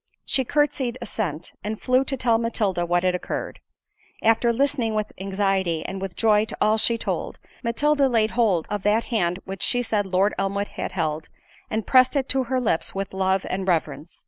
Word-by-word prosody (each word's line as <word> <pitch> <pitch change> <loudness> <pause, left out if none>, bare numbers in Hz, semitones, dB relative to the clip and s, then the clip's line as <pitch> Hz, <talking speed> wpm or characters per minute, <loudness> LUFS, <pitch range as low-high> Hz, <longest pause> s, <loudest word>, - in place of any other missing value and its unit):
She 265 - +1
curtsied 265 -3 0
assent, 200 - -4
and 215 +1 -4
flew 255 +1 +2
to 270 0 -1
tell 235 -3 +2
Matilda 200 -7 0
what 175 +1 +1
had 185 -1 +2
occurred. 180 - -4 0.6
After 225 +1 +4
listening 245 -3 +1
with 215 -1 -1
anxiety 195 -4 0
and 195 0 -5
with 195 -2 -5
joy 215 -1 +3
to - - -7
all 215 +1 +3
she 230 +2 +3
told, - - -3 0.3
Matilda 280 +4 +2
laid 225 -3 +2
hold 205 -9 +2
of 205 -1 -1
that 210 +3 +2
hand 180 -5 +1
which 195 0 -7
she 245 0 +1
said 210 -4 0
Lord 190 +2 +2
Elmwood 200 +1 -1
had - - -5
held, 160 -3 -2 0.4
and 220 0 -2
pressed 255 +1 +5
it 270 -2 +1
to 265 -1 +2
her 260 +2 0
lips 210 -9 -1
with 195 0 -4
love 190 0 +1
and 190 0 -3
reverence. 160 -3 -1
210 Hz, 190 wpm, -24 LUFS, 190-235 Hz, 0.6 s, pressed